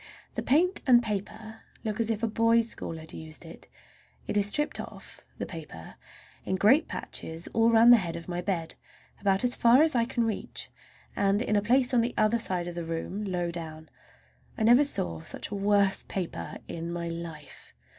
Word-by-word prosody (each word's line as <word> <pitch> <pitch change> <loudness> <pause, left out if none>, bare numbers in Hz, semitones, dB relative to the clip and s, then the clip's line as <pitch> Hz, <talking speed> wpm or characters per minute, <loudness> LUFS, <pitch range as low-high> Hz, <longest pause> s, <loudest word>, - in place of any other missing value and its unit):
The - - -3
paint 350 +7 +2
and 240 -2 +6
paper 220 +1 -5 0.2
look 215 0 -3
as 230 -1 +2
if 225 0 -2
a - - +3
boys' 230 +1 +3
school 165 - -3
had 160 0 -10
used 160 +1 -8
it. 165 - -9 0.6
It - - -4
is 205 -1 +3
stripped 295 +8 -1
off—the - - -9
paper—in 155 - -9
great 225 - +4
patches 160 +1 -4
all 230 +1 +4
around 230 +1 +7
the 240 - +9
head 175 -6 -3
of 170 - -8
my 175 0 -3
bed, 170 -4 -3 0.5
about 195 +1 +1
as 245 0 +3
far 240 +5 +6
as 320 - +3
I 230 -1 +3
can 240 -1 -1
reach, 225 -2 -4 0.4
and 200 0 +2
in 220 -2 0
a 205 - +3
great 205 - -10
place 255 +1 +3
on 240 - +4
the 235 +2 -2
other 215 +2 +3
side 180 -5 -1
of 175 - -5
the 170 0 -4
room 165 +5 -4
low 175 -3 -2
down. 160 -2 -8 0.7
I - - -1
never 240 +5 +6
saw 85 - 0 0.3
a - - -3
worse 200 -1 +2
paper 185 -3 -5
in 170 0 -5
my 170 0 -4
life. 165 -1 -8
205 Hz, 190 wpm, -28 LUFS, 170-230 Hz, 0.7 s, the